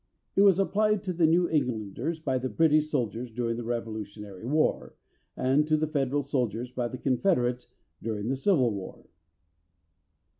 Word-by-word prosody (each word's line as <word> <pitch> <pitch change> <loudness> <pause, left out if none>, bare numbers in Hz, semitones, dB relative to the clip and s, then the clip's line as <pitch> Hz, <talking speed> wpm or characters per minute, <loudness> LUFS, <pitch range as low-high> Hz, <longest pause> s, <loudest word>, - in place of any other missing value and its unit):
It 195 - +5
was 195 -3 +6
applied 210 +1 +1
to 185 -2 -2
the 165 -1 +3
New 175 +2 +3
Englanders 125 - -2
by 130 -5 -1
the 130 +1 -3
British 155 0 +3
soldiers 120 -4 -2
during 115 0 -2
the 120 - -4
Revolutionary 110 -3 -5
War, 155 +3 0 0.4
and 135 +4 +2
to 155 0 +3
the 155 - +1
Federal 145 -2 0
soldiers 125 -3 -2
by 125 -1 -2
the 130 - -7
Confederates 125 -2 +1 0.3
during 110 -1 -3
the 135 - 0
Civil 135 - +2
War. 100 -2 -7
130 Hz, 155 wpm, -28 LUFS, 115-155 Hz, 0.4 s, was